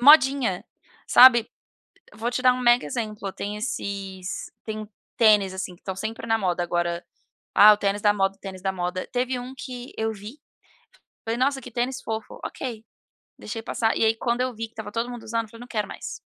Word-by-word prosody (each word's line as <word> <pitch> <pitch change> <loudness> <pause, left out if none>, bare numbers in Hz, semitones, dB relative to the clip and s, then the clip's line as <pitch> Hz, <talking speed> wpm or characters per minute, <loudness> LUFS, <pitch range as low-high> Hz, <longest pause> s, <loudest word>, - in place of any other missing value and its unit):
modinha, 265 - +6 0.4
sabe? 240 -2 +8 0.7
Vou 225 +3 -2
te 255 - -1
dar 255 -1 +6
um 255 - -4
mega 240 -3 +5
exemplo, 210 +3 -4
tem 205 +1 -4
esses 195 -4 -4
tem 215 -1 -4
uns 215 -1 -8 0.3
tênis, 210 -4 +5
assim, 185 -1 -5
que - - -27
estão 190 - -4
sempre 220 +4 -5
na 225 0 +3
moda 180 -4 0
agora: 175 0 -1 0.5
"Ah, 210 +1 +10
o - - +3
tênis 200 0 0
da 210 - +5
moda, 195 -1 0
tênis 190 -2 -8
da 190 0 0
moda". 180 0 -3
Teve 250 +1 0
um 250 +2 -7
que 250 -2 -7
eu 220 0 0
vi, 215 +6 -10 0.9
falei: 225 +1 -2
"Nossa, 270 +1 +1
que 250 - -9
tênis 250 +3 -2
fofo". 220 0 -5
Ok. 230 -5 -5 0.5
Deixei 225 +1 -6
passar, 225 0 0
e - - +3
aí 220 0 +3
quando 235 +1 -1
eu 255 -1 -2
vi 225 +1 -4
que 225 - -25
estava 215 -2 -7
todo 235 +2 -2
mundo 240 -2 -7
usando, 230 +1 -1
eu - - -14
falei: 230 - -13
"Não 245 - -10
quero 210 -4 -1
mais". - - -7
220 Hz, 205 wpm, -25 LUFS, 200-245 Hz, 0.9 s, Ah